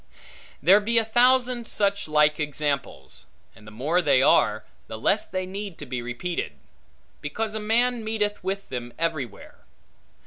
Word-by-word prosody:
There 190 Hz, +7 st, +7 dB
be 230 Hz, +3 st, 0 dB
a 225 Hz, -, +3 dB
thousand 245 Hz, +1 st, +3 dB
such 200 Hz, -2 st, 0 dB
like 150 Hz, 0 st, +3 dB
examples; 145 Hz, -2 st, -3 dB, 0.3 s
and 105 Hz, -1 st, -17 dB
the -, -, -10 dB
more 150 Hz, +11 st, 0 dB
they 140 Hz, -5 st, +4 dB
are, 110 Hz, -5 st, +3 dB, 0.2 s
the 110 Hz, -, -7 dB
less 200 Hz, -, +1 dB
they 185 Hz, -1 st, -4 dB
need 195 Hz, -1 st, -6 dB
to 150 Hz, -, -8 dB
be 125 Hz, -2 st, -4 dB
repeated; 125 Hz, -, -4 dB, 0.7 s
because 215 Hz, +9 st, -3 dB
a 220 Hz, -, -2 dB
man 235 Hz, +2 st, +1 dB
meeteth 210 Hz, -2 st, -2 dB
with 195 Hz, +1 st, -3 dB
them 120 Hz, -2 st, -6 dB
everywhere. 155 Hz, -10 st, -4 dB
180 Hz, 150 wpm, -25 LUFS, 140-215 Hz, 0.7 s, There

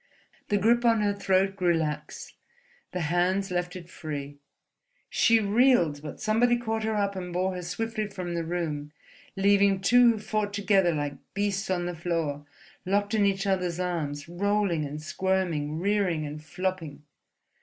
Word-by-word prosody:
The 205 Hz, -, +3 dB
grip 235 Hz, +4 st, +3 dB
on 230 Hz, -2 st, +4 dB
her 205 Hz, -1 st, +2 dB
throat 195 Hz, -1 st, +1 dB
grew 180 Hz, -3 st, +2 dB
lax, 155 Hz, -2 st, -4 dB, 0.6 s
the 180 Hz, -, -3 dB
hands 180 Hz, +4 st, +1 dB
left 180 Hz, 0 st, -2 dB
it 175 Hz, -2 st, -8 dB
free. 145 Hz, -4 st, -6 dB, 0.7 s
She 230 Hz, 0 st, +4 dB
reeled, 205 Hz, -, +3 dB
but 150 Hz, -1 st, -8 dB
somebody 240 Hz, +3 st, +3 dB
caught 225 Hz, -2 st, -2 dB
her 220 Hz, 0 st, -1 dB
up 200 Hz, -1 st, 0 dB
and 180 Hz, -1 st, -5 dB
bore 185 Hz, +2 st, 0 dB
her 180 Hz, -, -5 dB
swiftly 215 Hz, +5 st, -3 dB
from 185 Hz, -3 st, -5 dB
the 170 Hz, -1 st, -1 dB
room, 155 Hz, -3 st, -3 dB, 0.4 s
leaving 200 Hz, 0 st, +4 dB
two 240 Hz, +5 st, +5 dB
who -, -, -5 dB
fought 210 Hz, -1 st, -2 dB
together 195 Hz, -3 st, +3 dB
like 145 Hz, -1 st, -3 dB, 0.2 s
beasts 200 Hz, -1 st, -1 dB
on 175 Hz, -2 st, 0 dB
the 175 Hz, -, -3 dB
floor, 160 Hz, -4 st, -2 dB, 0.4 s
locked 205 Hz, +2 st, 0 dB
in 205 Hz, -2 st, +3 dB
each 195 Hz, 0 st, 0 dB
other's 180 Hz, -3 st, 0 dB
arms, 155 Hz, -5 st, -3 dB
rolling 190 Hz, -2 st, 0 dB
and 150 Hz, +2 st, -7 dB
squirming, 160 Hz, -3 st, -1 dB
rearing 185 Hz, -4 st, 0 dB
and 150 Hz, +1 st, -7 dB
flopping.... 175 Hz, -3 st, -4 dB
185 Hz, 160 wpm, -27 LUFS, 165-205 Hz, 0.7 s, two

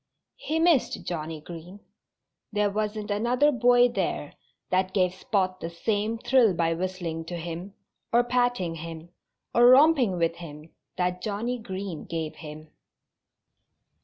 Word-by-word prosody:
He 320 Hz, -10 st, -2 dB
missed 325 Hz, -5 st, +2 dB
Johnnie 160 Hz, -2 st, -4 dB
Green. 175 Hz, +4 st, -10 dB, 0.7 s
There 210 Hz, -1 st, +1 dB
wasn't 210 Hz, 0 st, -3 dB
another 245 Hz, +8 st, +2 dB
boy 245 Hz, -1 st, +5 dB
there 240 Hz, -, -3 dB, 0.4 s
that 185 Hz, 0 st, +1 dB
gave 185 Hz, -2 st, +2 dB
Spot 185 Hz, -1 st, -1 dB
the 165 Hz, -, -5 dB
same 210 Hz, +5 st, -1 dB
thrill 235 Hz, -5 st, +3 dB
by 165 Hz, 0 st, +1 dB
whistling 175 Hz, -2 st, -4 dB
to 175 Hz, +1 st, -5 dB
him, 170 Hz, +4 st, -6 dB, 0.4 s
or 240 Hz, +1 st, +4 dB
patting 245 Hz, -8 st, 0 dB
him, 165 Hz, 0 st, -8 dB, 0.4 s
or 240 Hz, +1 st, +6 dB
romping 260 Hz, -, +6 dB
with 165 Hz, -1 st, 0 dB
him 155 Hz, -2 st, -10 dB, 0.3 s
that 180 Hz, 0 st, -1 dB
Johnnie 225 Hz, +5 st, -2 dB
Green 190 Hz, -5 st, -6 dB
gave 160 Hz, -2 st, -4 dB
him. 155 Hz, 0 st, -10 dB
190 Hz, 135 wpm, -26 LUFS, 165-235 Hz, 0.7 s, or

